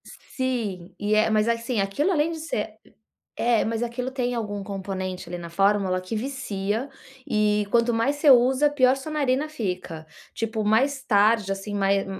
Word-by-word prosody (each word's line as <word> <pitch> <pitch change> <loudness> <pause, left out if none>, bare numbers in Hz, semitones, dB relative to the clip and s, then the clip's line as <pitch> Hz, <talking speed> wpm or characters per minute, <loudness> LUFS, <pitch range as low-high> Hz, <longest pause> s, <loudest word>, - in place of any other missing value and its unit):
Sim, 225 -9 -4
e 205 +1 0
é 215 +1 +4
mas 215 0 +2
assim 230 0 -1
aquilo 195 - 0
além 320 -1 +1
de 325 - -5
ser 220 -9 -4 0.6
é, 235 -1 +2
mas 225 0 -2
aquilo 245 +2 -3
tem 245 -2 -2
algum 205 -3 -3
componente 190 -2 -5
ali 175 - -4
na 170 -1 -8
fórmula 195 0 +2
que 185 +4 -5
vicia 225 -1 -3 0.4
e 210 -1 +2
quanto 235 0 +3
mais 265 +6 +1
você 290 0 +4
usa 260 +3 +5
pior 260 -3 +4
a - - +2
sua 275 +3 -7
narina 285 -1 +1
fica. 180 - -5 0.3
Tipo 225 -1 -2
mais 265 +6 +2
tarde, 210 -3 +3
assim, 195 +2 -4
mais 195 -1 +1
220 Hz, 170 wpm, -25 LUFS, 200-260 Hz, 0.6 s, usa